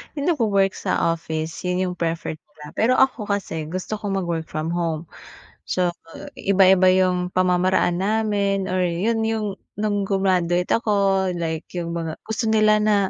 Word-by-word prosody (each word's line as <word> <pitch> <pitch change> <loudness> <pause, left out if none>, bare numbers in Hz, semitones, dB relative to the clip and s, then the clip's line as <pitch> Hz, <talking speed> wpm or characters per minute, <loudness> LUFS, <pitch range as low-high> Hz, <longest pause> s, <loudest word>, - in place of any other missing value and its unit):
’yong 295 +4 +1
nagwo-work 200 - +2
sa 170 - 0
office, 160 -1 -4
’yon 180 +1 0
'yong 180 -1 -3
preferred 165 -2 -2
nila, 150 0 -14
pero 250 +3 +2
ako 255 -5 +2
kasi, 170 -6 -3
gusto 185 +5 -4
ko 205 - -5
mag-work 170 -4 -2
from 155 +1 -3
home. 170 -2 -1 0.6
So, 175 -1 -1 0.4
iba-iba 190 -1 +5
'yong 180 -1 +1
pamamaraan 180 -1 +2
namin, 200 -1 0
or 185 0 +1
’yon 215 +7 0
'yong 215 -3 -2 0.2
no’ng 205 -2 0
gru-maduate 180 -3 +1
ako. 195 -4 +1
Like 160 -1 -4
’yong 170 -1 -4
mga, 165 -1 -3
gusto 220 +1 -3
nila 215 -1 +5
na, 215 -1 +4
185 Hz, 150 wpm, -22 LUFS, 170-205 Hz, 0.6 s, iba-iba